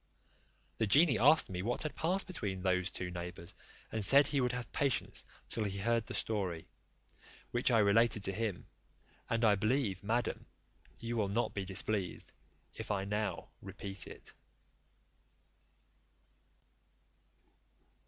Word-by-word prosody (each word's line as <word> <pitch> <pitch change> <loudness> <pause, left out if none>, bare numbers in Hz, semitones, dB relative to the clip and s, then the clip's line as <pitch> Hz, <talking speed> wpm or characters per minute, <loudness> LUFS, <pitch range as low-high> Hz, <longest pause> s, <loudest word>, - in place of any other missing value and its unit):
The 110 - +2
genie 145 - +5
asked 150 +6 +6
me 90 -1 -3
what 120 +9 -2
had 155 - -3
passed 185 +4 0
between 100 - -4
those 90 0 +1
two 90 -4 -5
neighbours, 85 0 -7 0.4
and 110 -1 -1
said, 140 +7 +7
he 140 -1 +1
would 125 -1 +1
have 125 -1 -5
patience 140 -5 0 0.2
till 110 - 0
he 100 -1 -3
heard 115 +2 +1
the - - -5
story, 95 -7 -2 0.9
which 120 +2 +2
I 120 - +4
related 105 +1 +4
to 95 - +1
him; 105 -3 -3 0.6
and 115 0 +2
I 105 - +6
believe, 105 -2 0
madam, 115 +3 -1 0.5
you 115 +1 -4
will 105 -3 +1
not 115 +4 0
be 100 -2 -3
displeased 95 0 -2 0.4
if - - -7
I 100 -2 0
now 105 -2 -2
repeat 95 0 -5
it. - - -9
105 Hz, 135 wpm, -34 LUFS, 95-120 Hz, 0.9 s, said